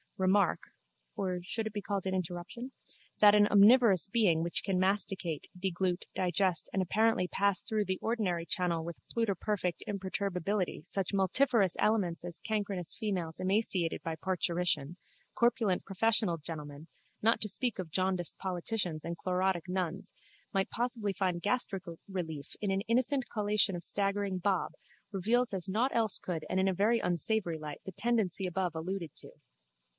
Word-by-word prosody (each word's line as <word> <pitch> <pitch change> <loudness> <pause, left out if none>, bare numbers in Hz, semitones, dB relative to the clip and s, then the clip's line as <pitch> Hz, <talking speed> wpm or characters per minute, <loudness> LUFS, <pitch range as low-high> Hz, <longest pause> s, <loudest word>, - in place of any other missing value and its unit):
remark 190 0 +3 0.6
(or 185 -2 -2
should 220 +5 -3
it 220 - -4
be 205 - -3
called 200 -2 -3
an 190 - -1
interruption?) 185 +8 -4 0.5
that 205 -1 +8
an 205 0 +6
omnivorous 210 -2 +6
being 195 -7 +2
which 170 - 0
can 190 -2 0
masticate, 190 -4 0
deglute, 180 -1 -1
digest 185 -1 +1
and 190 - +1
apparently 215 +1 +2
pass 200 0 +1
through 215 -2 -1
the 190 -1 -1
ordinary 195 -8 0
channel 170 -1 0
with 170 0 -6
pluterperfect 200 -4 -1
imperturbability 195 -1 -2
such 195 -2 -2
multifarious 200 0 +3
aliments 190 -7 +1
as 175 -1 -4
cancrenous 200 -5 -2
females 180 -7 -3
emaciated 185 -3 +1
by 165 -1 -3
parturition, 175 -3 -1 0.4
corpulent 235 -6 +2
professional 200 -2 +2
gentlemen, 150 -1 -8 0.4
not 225 +2 +4
to 210 - +8
speak 245 +2 -1
of 175 -4 -5
jaundiced 185 0 0
politicians 180 -3 -2
and 170 0 -4
chlorotic 185 -1 0
nuns, 185 0 -3 0.4
might 195 -1 +1
possibly 235 -4 -2
find 180 -3 -1
gastric 205 -4 0 0.2
relief 160 -7 -5
in 205 - -2
an 195 0 +1
innocent 250 +4 +1
collation 210 -2 +2
of 175 - -5
staggering 200 -1 0
bob, 190 0 0 0.4
reveals 230 +6 +2
as 190 0 -3
nought 230 +7 +1
else 225 -3 +2
could 165 -4 -4
and 190 - +1
in 190 - +2
a 190 - +2
very 215 +5 +2
unsavoury 175 -1 0
light 150 -2 -7
the 190 - -5
tendency 205 -3 0
above 180 -2 -2
alluded 170 0 -4
to. - - -5
190 Hz, 150 wpm, -31 LUFS, 175-210 Hz, 0.6 s, that